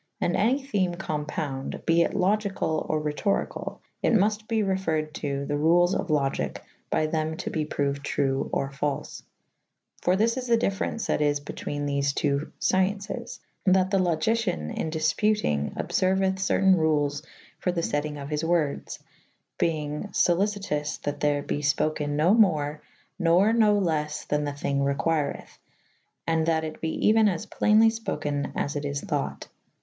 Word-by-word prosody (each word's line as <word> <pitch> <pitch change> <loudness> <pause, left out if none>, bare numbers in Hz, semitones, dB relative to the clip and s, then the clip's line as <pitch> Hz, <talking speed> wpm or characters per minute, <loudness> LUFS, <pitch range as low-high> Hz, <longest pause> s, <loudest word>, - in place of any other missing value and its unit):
And 175 - +1
any 245 +7 +2
theme 190 -10 0
compounde 150 -5 -4
be 165 0 +4
it - - 0
Logycall 195 -4 0
or 155 - +1
Rhetor 150 +7 0
ycall - - -7
/ - - -48
it - - +2
multe 215 +1 +1
be 220 -2 +1
referryd 165 -6 -1
to 140 -3 -3
the 145 +1 -1
rules 175 +4 +4
of 195 - -1
Logike 140 -4 0 0.3
by 155 - +1
thew 155 0 -1
to - - -5
be 155 -1 -1
prouyd 140 -1 -1
true 135 -1 -1
or 135 0 -1
falfe. 140 +1 -3 0.8
For 180 - +3
thys 230 +5 +2
is 255 -1 -3
the 235 -1 +4
dyfference 220 0 -1
that - - 0
is 145 -1 +2
betwene 145 0 -5
thefe 140 -1 0
two 145 0 0
fciencis 200 +5 -1 0.2
/ - - -46
that 190 0 +2
the 195 - +3
Logycyan 175 - 0
in 160 - -2
difputynge 155 - 0
obferuythe 190 0 +1
certayne 190 -1 +3
rules 145 -2 +1 0.4
for 180 - 0
the 175 -1 -1
fettynge 150 -1 -2
of 140 0 -7
his 150 +1 -2
words 165 -4 0 0.3
[,] - - -47
beynge 155 +3 -2
folycytous 180 -5 0
that 145 0 -3
ther 145 -1 +1
be - - -2
fpokyn 150 0 0
no 160 +6 +4
more 155 -9 +2 0.4
nor 180 +5 +4
no 215 -3 +4
les 155 -5 -1
then 150 0 0
the 145 - -3
thynge 140 -1 -1 0.2
requirith 155 0 -2 0.3
/ - - -44
and 160 -1 +1
that 160 -1 +2
[A 155 - -3
viii - - -14
b] 160 - -1
it 160 - -3
be - - +3
eue« 220 -1 +5
as 175 -4 -3
playnly 220 +1 +4
fpoke« 145 -6 -2
as 145 - -2
it 145 - -2
is 140 0 -2
thought. - - -3
160 Hz, 175 wpm, -26 LUFS, 145-195 Hz, 0.8 s, eue